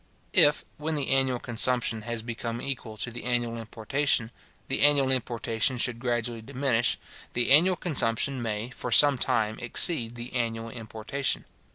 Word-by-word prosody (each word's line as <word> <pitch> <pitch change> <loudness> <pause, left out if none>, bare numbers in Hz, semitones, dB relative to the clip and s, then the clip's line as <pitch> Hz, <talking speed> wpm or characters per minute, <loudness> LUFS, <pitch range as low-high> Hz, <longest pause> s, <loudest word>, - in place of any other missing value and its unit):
If, 150 0 +4
when 155 +1 -2
the 140 -3 -1
annual 135 -2 +2
consumption 120 -1 +1
has 115 -1 -1
become 115 0 -5
equal 120 -5 -5
to 120 - -3
the 120 - -6
annual 120 -1 -1
importation, 115 +2 -1 0.4
the - - 0
annual 145 -2 +4
importation 120 -1 0
should 120 -1 0
gradually 120 -2 -2
diminish, 125 -1 0 0.4
the 120 +2 +1
annual 175 +6 +6
consumption 135 -5 0
may, 110 +1 -4
for 125 - -6
some 140 +2 +7
time, 110 -2 0
exceed 120 0 +2
the 120 +2 -7
annual 115 -2 -3
importation. 110 +4 -4
120 Hz, 150 wpm, -27 LUFS, 115-135 Hz, 0.4 s, some